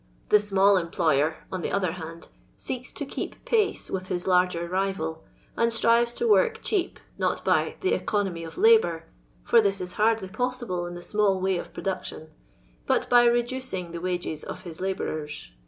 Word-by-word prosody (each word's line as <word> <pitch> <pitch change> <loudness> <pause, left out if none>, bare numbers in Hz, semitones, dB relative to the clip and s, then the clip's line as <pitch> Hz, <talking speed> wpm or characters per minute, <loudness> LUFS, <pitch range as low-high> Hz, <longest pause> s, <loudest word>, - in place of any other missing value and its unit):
The - - +7
Mnail 200 -1 +4
employer, 160 -2 +1 0.2
on 185 - -3
the - - -3
other 185 -4 +1
band, 165 -1 -9 0.3
seeks 255 -1 -5
to 285 - -4
keep - - -6
pace 430 -3 +1
with 185 -1 -3
his 180 -2 -2
lirger 180 -2 +2
rival, 190 - -2 0.3
and 230 0 +2
strives 235 +1 +3
to 470 - 0
work 455 +1 +4
cheap, 385 -3 -1 0.2
not - - -1
by - - +2
" - - -31
the 380 - +1
economy 195 -5 -1
of 165 - -9
labour" 435 - +4 0.4
(for 230 - +5
this 200 -2 0
is 180 -1 -5
hardly 220 -3 +2
possible 240 -6 -2
in 175 - -7
the 175 - -8
small 205 -2 +1
way 190 -1 0
of - - -8
production), 185 -4 -5 0.6
but - - +1
by 240 0 +7
reducing 240 -7 0
the 170 0 -6
wages 175 -4 -3
of - - -7
his 170 -2 -9
labourers. 155 - -4
190 Hz, 175 wpm, -26 LUFS, 175-235 Hz, 0.6 s, The